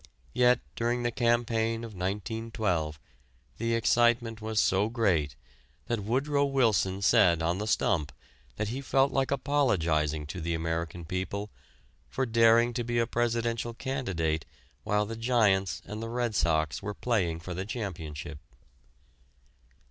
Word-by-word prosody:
Yet 125 0 +4
during 120 +1 0
the 120 - 0
campaign 115 -1 +1
of 115 -2 -7
1912 95 -4 -2 0.6
the 115 +1 0
excitement 115 0 +2
was 110 0 -1
so 100 +3 +2
great 90 - +1 0.5
that 120 -2 -1
Woodrow 140 +6 +1
Wilson 110 -8 +1
said 85 -4 +4
on 85 +3 0
the 105 - -3
stump 80 -8 +1 0.5
he 110 +6 -3
felt 135 0 +2
like 135 0 0
apologizing 85 - +1
to 85 +4 -6
the 85 +1 -1
American 80 +1 -3
people 95 +4 -4 0.6
for 130 - -1
daring 115 0 +4
to 120 - -2
be 120 0 -2
a 115 - +3
presidential 115 0 -1
candidate 85 - -2 0.4
while 105 0 +1
the 115 +2 -5
Giants 110 -5 +1
and 105 +1 -6
the 115 - -4
Red 120 -1 -1
Sox 80 -6 +1
were 105 +1 -5
playing 90 -9 0
for 90 +2 -6
the 95 +2 -3
championship. 80 - -6
110 Hz, 135 wpm, -29 LUFS, 90-120 Hz, 0.6 s, Yet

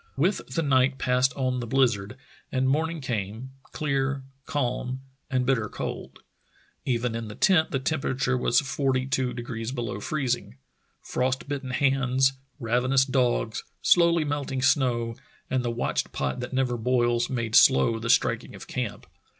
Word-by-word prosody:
With 180 +8 +1
the 165 - +1
night 130 -1 +3
passed 125 +1 +2
on 130 -2 -1
the 120 - -4
blizzard, 120 -3 +1 0.3
and 130 0 +1
morning 160 +4 0
came 115 0 -4
— - - -40
clear, 135 -2 -1 0.2
calm, 130 -1 -2 0.3
and 130 -3 +1
bitter 120 -5 +1
cold. - - -6 0.6
Even 120 -2 0
in 115 -1 -4
the 105 - -8
tent 175 -5 +4
the 135 - 0
temperature 135 -2 0
was 125 0 +3
forty 135 -2 0
two 130 -1 0
degrees 120 -1 -5
below 115 -6 -4
freez 135 -1 0
ing. 65 - -14 0.5
Frost 130 +2 -1
bitten 140 -2 -4
hands, 135 0 +2 0.3
ravenous 125 +3 +2
dogs, 125 -4 0 0.2
slowly 170 -2 +5
melting 140 -3 -2
snow, 120 -4 +2 0.3
and 130 -1 +1
the 120 - -1
watched 115 +1 -1
pot 65 - -2
that 125 - -5
never 130 -2 0
boils 120 0 +1
made 115 -3 -2
slow 115 -3 +5
the 115 +1 -4
striking - - +2
of - - -10
camp. - - -4
130 Hz, 155 wpm, -26 LUFS, 120-135 Hz, 0.6 s, slowly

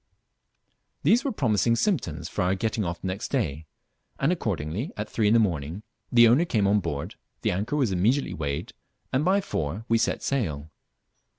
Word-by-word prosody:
These 240 +4 +4
were 275 - -1
promising 115 - +2
symptoms 115 - -1
for - - -3
our 90 +1 +2
getting 110 +2 -1
off 85 -1 -4
the - - -3
next 95 +4 -3
day; 80 - -2 0.5
and 140 +5 +2
accordingly, 100 - -2
at 105 - -3
three 110 -2 0
in 110 - +4
the - - +6
morning, 85 -2 -1 0.3
the 120 -1 +7
owner 125 +9 +5
came 110 - +1
on 100 +1 +4
board, 70 -6 -4 0.3
the - - +2
anchor 105 +10 -2
was 130 -8 +1
immediately 110 +10 +1
weighed, 70 -3 -4 0.4
and 130 - +2
by 190 +4 +3
four 95 - -3
we 115 0 +3
set - - 0
sail. 80 - -2
105 Hz, 180 wpm, -26 LUFS, 85-125 Hz, 0.5 s, the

